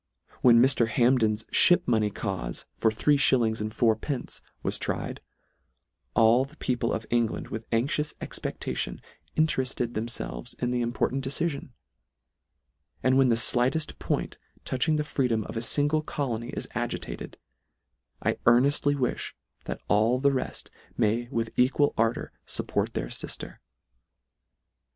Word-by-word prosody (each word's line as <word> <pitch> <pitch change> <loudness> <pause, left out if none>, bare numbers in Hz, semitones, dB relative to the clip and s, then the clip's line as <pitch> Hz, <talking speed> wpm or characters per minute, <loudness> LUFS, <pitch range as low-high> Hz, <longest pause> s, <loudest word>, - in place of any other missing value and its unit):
When 120 -2 +7
Mr. 125 -2 +4
Hamp 125 +3 +3
den 110 -2 +3
s 105 +1 -5
lhip 175 +8 +5
money 110 -3 +2
caufe, 95 - -4
for 110 - +2
three 145 +7 +2
(hillings 115 -5 +3
and 105 0 -3
four 115 -1 +3
pence, 125 +3 -5 0.2
was - - -1
tried, - - -3 0.9
all 115 +3 +5
the 145 +3 -12
people 120 -4 -1
of 110 - -3
England, 120 -2 0
with 110 +1 -6
anxious 140 +6 0
expectation, - - -4 0.4
intereft 135 -5 +1
ed 120 -1 -1
themfelves 110 - -4
in 125 0 -1
the 125 0 0
important 120 +3 -1
decifion; 140 +1 -2 1.3
and 130 0 +4
when 135 -1 +5
the 115 - +4
flighteft 125 +7 +1
point - - -2 0.3
touching 145 +5 +1
the 150 - 0
free 140 -3 0
dom 110 -2 0
of - - -8
a 115 - -2
fingle 145 +6 +2
colony 120 -6 -3
is - - -3
agitated, - - -4 0.9
I - - 0
earnest 135 +5 +4
ly 145 - +4
wilh, 130 -3 -2 0.3
that - - -5
all 110 +4 +3
the 140 +2 +3
reft 130 -2 -4 0.3
may 115 +3 +1
with 115 -3 -2
equal 135 +3 +3
ar 115 +1 +3
dour - - -7 0.2
fupport - - -2
their - - -2
lifter. - - -6
120 Hz, 150 wpm, -27 LUFS, 115-135 Hz, 1.3 s, When